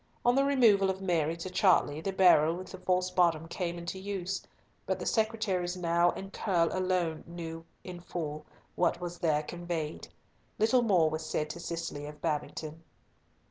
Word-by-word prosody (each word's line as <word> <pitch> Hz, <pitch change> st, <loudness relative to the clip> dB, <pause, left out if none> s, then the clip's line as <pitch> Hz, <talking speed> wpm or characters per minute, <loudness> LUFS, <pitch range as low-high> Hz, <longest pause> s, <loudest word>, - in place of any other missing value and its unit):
On 245 Hz, -, +5 dB
the 275 Hz, +2 st, +3 dB
removal 230 Hz, -9 st, +4 dB
of 190 Hz, 0 st, -2 dB
Mary 170 Hz, -4 st, 0 dB
to 170 Hz, +3 st, -5 dB
Chartley 180 Hz, -5 st, +3 dB
the 195 Hz, -, -2 dB
barrel 175 Hz, -4 st, +5 dB
with 185 Hz, +1 st, -8 dB
the 185 Hz, -, -8 dB
false 185 Hz, 0 st, 0 dB
bottom 170 Hz, -3 st, +2 dB
came 175 Hz, 0 st, -3 dB
into 175 Hz, +2 st, -5 dB
use, 195 Hz, -1 st, -3 dB, 0.5 s
but -, -, 0 dB
the -, -, -6 dB
secretaries 210 Hz, -5 st, 0 dB
Nau 170 Hz, 0 st, +3 dB
and 195 Hz, +1 st, -8 dB
Curll 175 Hz, -5 st, +1 dB
alone 180 Hz, -4 st, 0 dB
knew 165 Hz, -1 st, -7 dB, 0.2 s
in 180 Hz, -1 st, -8 dB
full 155 Hz, -3 st, -5 dB, 0.3 s
what 175 Hz, -, +1 dB
was 175 Hz, -1 st, -6 dB
there 155 Hz, -3 st, +1 dB
conveyed. 170 Hz, -2 st, -4 dB, 0.5 s
Little 235 Hz, +4 st, +4 dB
more 185 Hz, -9 st, +4 dB
was 155 Hz, +1 st, -3 dB
said 155 Hz, -1 st, -2 dB
to 170 Hz, -, -8 dB
Cicely 165 Hz, -4 st, -5 dB
of 150 Hz, 0 st, -10 dB
Babington. 155 Hz, +1 st, -3 dB
175 Hz, 170 wpm, -30 LUFS, 165-190 Hz, 0.5 s, On